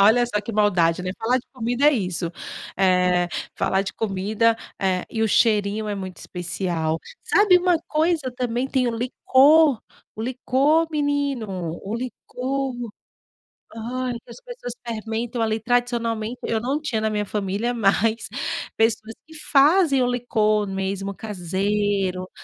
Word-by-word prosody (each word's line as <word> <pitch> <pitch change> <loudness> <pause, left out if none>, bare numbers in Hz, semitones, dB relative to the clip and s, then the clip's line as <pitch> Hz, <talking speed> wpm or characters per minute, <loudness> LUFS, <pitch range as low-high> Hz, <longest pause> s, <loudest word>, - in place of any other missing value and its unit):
Olha 225 +4 +5
só 210 -3 -1
que 225 +2 -6
maldade, 180 -5 +2
né, 185 - -3
falar 245 +3 +2
de 245 - -12
comida 245 +3 0
é 300 - +7
isso. 180 - -2 0.5
Eh, 180 -2 +3 0.3
falar 190 0 +1
de 195 - -5
comida, 215 +2 +1 0.2
eh 185 -2 +1
e 225 -1 -2
o 220 - +2
cheirinho 210 -1 +2
é 205 - -1
muito 190 -2 -6
especial. 175 -3 -3 0.2
Sabe, 405 -3 +5
uma 355 -2 +2
coisa 310 -4 +1
também 245 +1 -1
tem 260 -2 +1
o 230 - -2
licor, 270 +3 +4 0.4
o 220 - -4
licor 270 +6 +2
menino, 270 - -1
o 205 +3 -3
licor. 255 +2 -3 1.0
Ai, 245 +2 -3
que - - -22
as - - -11
pessoas - - -8
fermentam, 230 +1 -3
ali, 220 0 0
tradicionalmente. 235 -1 -1
Eu 220 -1 -1
não 270 +5 -1
tinha 225 -8 -1
na 220 - +1
minha 210 -1 -1
família, 205 +4 -2
mas 225 0 +1 0.5
pessoas 225 0 +1
que 320 - -14
fazem 300 0 +4
o 245 - +2
licor 215 -4 +1
mesmo 195 0 -3
caseiro, 195 -1 -1
225 Hz, 145 wpm, -23 LUFS, 200-255 Hz, 1.0 s, é